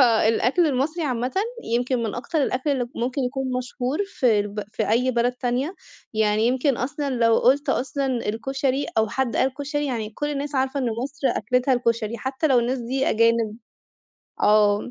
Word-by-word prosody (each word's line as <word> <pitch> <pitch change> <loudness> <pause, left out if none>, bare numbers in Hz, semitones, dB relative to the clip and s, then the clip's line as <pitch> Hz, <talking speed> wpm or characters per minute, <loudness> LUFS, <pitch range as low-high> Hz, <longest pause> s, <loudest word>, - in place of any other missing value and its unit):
فالأكْل 240 +6 +4
المصري 300 +5 0
عامةً 250 -2 -1 0.3
يمكن 245 +1 0
من 220 -3 -2
أكتر 295 +5 -1
الأكْل 265 +2 0
اللي 255 -4 0
ممكن 255 +3 -2
يكون 265 +2 -2
مشهور 255 +2 -3
في 240 - +2
الب 205 +1 -4
في - - -1
أي 250 +3 +3
بلد 240 0 +1
تانية، 250 +7 -2 0.4
يعني 215 0 +2
يمكن 260 +1 +1
أصلًا 280 +3 -2
لو 230 -3 +3
قُلت 275 +4 +3
أصلًا 275 +2 0 0.2
الكُشري 270 +5 -1
أو 220 -1 +2
حد 265 +1 -1
قال 260 0 +1
كُشري، 290 0 -2
يعني 225 -5 -3
كُلّ 295 +7 -3
الناس 285 0 -4
عارفة 265 +1 0
إن 255 - -1 0.2
مصر 280 0 -3
أكلتها 250 +3 +1
الكُشري، 230 -2 -1
حتى 265 +4 -1
لو 265 -5 +4
الناس 245 +3 0
دي 255 +3 -1
أجانب 230 -1 +2 0.9
آه، 210 +2 +4
250 Hz, 170 wpm, -23 LUFS, 230-275 Hz, 0.9 s, فالأكْل